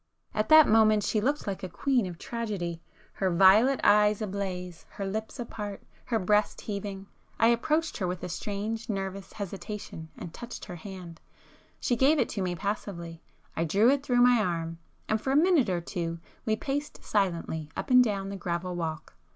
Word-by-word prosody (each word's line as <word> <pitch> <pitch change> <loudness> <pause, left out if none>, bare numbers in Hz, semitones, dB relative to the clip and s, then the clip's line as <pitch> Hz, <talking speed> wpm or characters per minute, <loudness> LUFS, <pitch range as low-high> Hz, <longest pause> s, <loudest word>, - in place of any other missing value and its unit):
At 215 0 -1
that 315 -1 +9
moment 215 -1 +5
she 215 - +1
looked 285 +6 0
like 195 -2 -3
a 185 - -5
queen 250 +3 +1
of 175 -2 -7
tragedy,—her 190 -4 -4
violet 210 +9 +6
eyes 210 0 +5
ablaze,—her 190 -2 -5
lips 220 +6 -4
apart,—her 220 0 -5
breast 210 +1 +1
heaving;——I 200 +2 -2
approached 305 +7 +1
her 185 - -1
with 180 -1 -4
a - - -2
strange 210 +6 -4
nervous 195 -1 -4
hesitation 195 -4 -6
and 165 - -8
touched 240 0 -8
her 175 - -8
hand. 180 -2 -9 0.6
She 245 - +1
gave 275 +6 +4
it - - +1
to 200 - -3
me 180 -1 -1
passively,—I 170 -5 -5
drew 205 - +4
it 280 -1 +1
through 245 -3 +2
my 245 -1 +6
arm, 165 -4 -2 0.3
and 220 0 0
for 265 - -3
a 270 - +2
minute 315 - +4
or 175 -2 0
two 170 -1 -4 0.3
we 220 - +3
paced 290 +5 -4
silently 170 -6 -1
up - - -4
and 250 0 +8
down 200 -4 -2
the 200 - -5
gravel 175 0 -3
walk. 160 -2 -4
200 Hz, 165 wpm, -28 LUFS, 180-230 Hz, 0.6 s, that